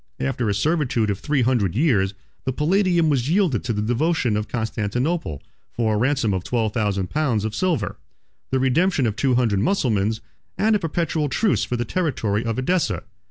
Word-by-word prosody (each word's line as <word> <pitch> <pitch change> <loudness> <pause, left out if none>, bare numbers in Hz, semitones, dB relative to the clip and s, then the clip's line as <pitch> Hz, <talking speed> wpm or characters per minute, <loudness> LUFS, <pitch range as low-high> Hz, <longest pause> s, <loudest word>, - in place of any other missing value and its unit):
After 105 - -1
a 100 - 0
servitude 125 -4 +1
of 100 - -3
three 145 -4 +1
hundred 115 -7 +1
years, 105 - +2 0.3
the 130 - -1
Palladium 175 +3 +2
was 140 -3 +1
yielded 175 - +2
to 120 - -1
the 105 -1 -1
devotion 120 0 +1
of 105 0 -2
Constantinople, 110 - -2 0.3
for 110 -2 0
a - - +1
ransom 125 -2 +1
of 95 -2 -2
twelve 110 -2 -1
thousand 100 -5 -1
pounds 130 -9 0
of 110 - -3
silver, 175 +4 -1 0.5
the 130 - +1
redemption 135 +3 +2
of 110 -3 0
two 130 +1 +1
hundred 115 -5 +2
Mussulmans, 110 - +1 0.4
and 220 +1 +3
a - - +2
perpetual 165 -3 -1
truce 210 +9 +1
for 125 - -2
the 120 - -2
territory 115 - -1
of 115 -1 -2
Edessa. 175 +7 0
125 Hz, 180 wpm, -22 LUFS, 105-155 Hz, 0.5 s, and